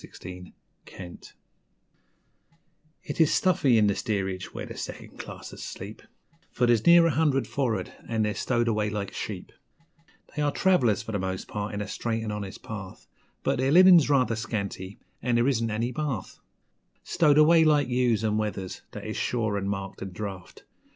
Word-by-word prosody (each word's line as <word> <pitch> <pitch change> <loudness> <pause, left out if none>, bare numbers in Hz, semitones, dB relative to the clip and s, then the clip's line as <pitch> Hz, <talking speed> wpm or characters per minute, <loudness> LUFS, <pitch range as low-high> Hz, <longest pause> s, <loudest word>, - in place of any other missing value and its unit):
'For'ard' 90 0 -12 1.7
It - - -2
is 160 - +5
stuffy 145 -10 +3
in 105 - +4
the 100 - +3
steerage 95 -3 -3
where - - -6
the - - -9
second - - -8
classers - - -9
sleep, 100 +3 -8 0.5
For 125 - +1
there's 120 +1 +2
near 170 0 +8
a 165 - +3
hundred 145 -3 +2
for'ard, 115 -9 -2 0.2
and 110 -2 +1
they're 105 - -1
stowed 120 +2 0
away 105 -2 +1
like 100 -2 -4
sheep, - - -6 0.8
They 150 - -1
are 145 -1 +2
trav'lers 125 - +2
for 110 - -6
the 100 - -1
most 95 0 -3
part 105 0 -4
in 100 - -3
a 105 - -4
straight 115 +2 -2
'n' 110 - -3
honest 100 -2 -6
path; 100 -4 -8 0.4
But - - 0
their 130 +1 +2
linen's 180 -2 +7
rather 130 -5 +3
scanty, 100 -3 -4 0.2
an' 120 0 0
there 120 +2 +3
isn't 115 -4 +1
any 115 +3 -1
bath 135 -6 -4 0.6
Stowed 150 -4 +3
away 160 +2 +6
like 150 -3 +3
ewes 125 -3 +1
and 110 -1 +1
wethers 100 -3 -4
that - - -7
is - - -4
shore 110 -4 -1
'n' 100 -1 -2
marked 100 -1 -4
'n' 95 -1 -6
draft. 95 -2 -7
110 Hz, 170 wpm, -27 LUFS, 100-135 Hz, 1.7 s, near